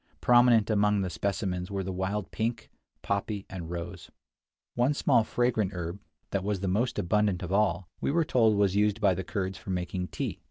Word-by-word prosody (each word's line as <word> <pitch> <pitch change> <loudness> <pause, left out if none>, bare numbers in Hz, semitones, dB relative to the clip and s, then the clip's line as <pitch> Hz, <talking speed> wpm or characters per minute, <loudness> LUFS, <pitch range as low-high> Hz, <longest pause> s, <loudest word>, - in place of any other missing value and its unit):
Prominent 120 -3 +5
among 105 -1 +3
the 95 -2 -2
specimens 95 -2 -2
were 100 -1 -2
the 95 - -4
wild 95 +1 -3
pink, 115 +1 -3 0.3
poppy, 100 0 -2
and 85 -4 -6
rose. 85 0 -6 0.6
One 125 +4 +2
small 115 - +3
fragrant 110 -4 0
herb, 85 +2 -4 0.3
that 100 -2 -1
was 100 -2 -1
the 95 - -1
most 115 +7 0
abundant 100 0 +1
of 90 - -5
all, 95 -4 +1
we - - -1
were 165 +3 +2
told 115 -7 +3
was 100 -2 +2
used 105 +1 +2
by 100 -3 +4
the 95 +1 -3
Kurds 95 -1 -3
for - - -11
making 90 0 -2
tea. - - -4
100 Hz, 190 wpm, -28 LUFS, 90-110 Hz, 0.6 s, Prominent